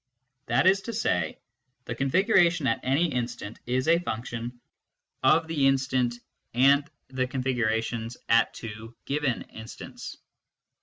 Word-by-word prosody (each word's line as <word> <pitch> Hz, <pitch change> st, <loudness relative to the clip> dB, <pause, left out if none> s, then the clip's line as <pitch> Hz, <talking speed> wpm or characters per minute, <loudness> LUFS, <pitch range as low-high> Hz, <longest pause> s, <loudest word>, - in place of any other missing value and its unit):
That -, -, +2 dB
is 190 Hz, +1 st, +5 dB
to -, -, -3 dB
say, 90 Hz, -, 0 dB, 0.5 s
the 120 Hz, -, -3 dB
configuration 175 Hz, -, +3 dB
at 115 Hz, -3 st, +2 dB
any 145 Hz, +6 st, +1 dB
instant 120 Hz, -3 st, -4 dB
is 130 Hz, +3 st, 0 dB
a 165 Hz, +1 st, +5 dB
function 120 Hz, -4 st, -5 dB, 0.6 s
of 160 Hz, 0 st, +4 dB
that 165 Hz, -, -4 dB
instant 130 Hz, -3 st, +2 dB, 0.4 s
and 140 Hz, +3 st, +4 dB, 0.2 s
the 130 Hz, -1 st, -1 dB
configurations 120 Hz, -3 st, -1 dB
at 115 Hz, 0 st, +4 dB
two 115 Hz, +1 st, -8 dB
given 140 Hz, -3 st, -1 dB
instants. 110 Hz, 0 st, -9 dB
130 Hz, 120 wpm, -27 LUFS, 115-145 Hz, 0.6 s, is